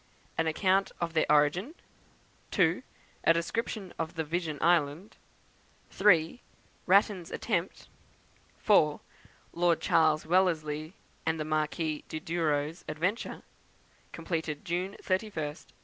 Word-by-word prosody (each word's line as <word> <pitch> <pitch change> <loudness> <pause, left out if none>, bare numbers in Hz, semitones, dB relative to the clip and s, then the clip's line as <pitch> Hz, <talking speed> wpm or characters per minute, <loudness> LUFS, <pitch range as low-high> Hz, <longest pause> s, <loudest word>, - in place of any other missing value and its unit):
An 165 - 0
Account 190 +4 +2
of 170 -1 -2
their 160 - +2
Origin; 150 - +2 0.7
2. - - +2 0.4
A 165 - +6
Description 190 +3 -3
of 165 0 -3
Vision 160 -1 -2
Island; 165 +2 +1 0.7
3. 185 +1 +3 0.5
Ratten's 190 -2 +3
Attempt; 185 -5 -2 0.7
4. 155 -8 +3 0.5
Lord 170 -1 +2
Charles 155 -1 +3
Wellesley 160 -2 +1 0.3
and 160 0 -1
the 155 - -2
Marquis 155 0 -1
of 155 - -5
Douro's 160 -1 -1
Adventure; 180 +9 -2 0.7
completed 160 -4 -4
June 180 +3 -2
31st, 185 -6 -3
1829. - - -22
165 Hz, 105 wpm, -30 LUFS, 155-185 Hz, 0.7 s, A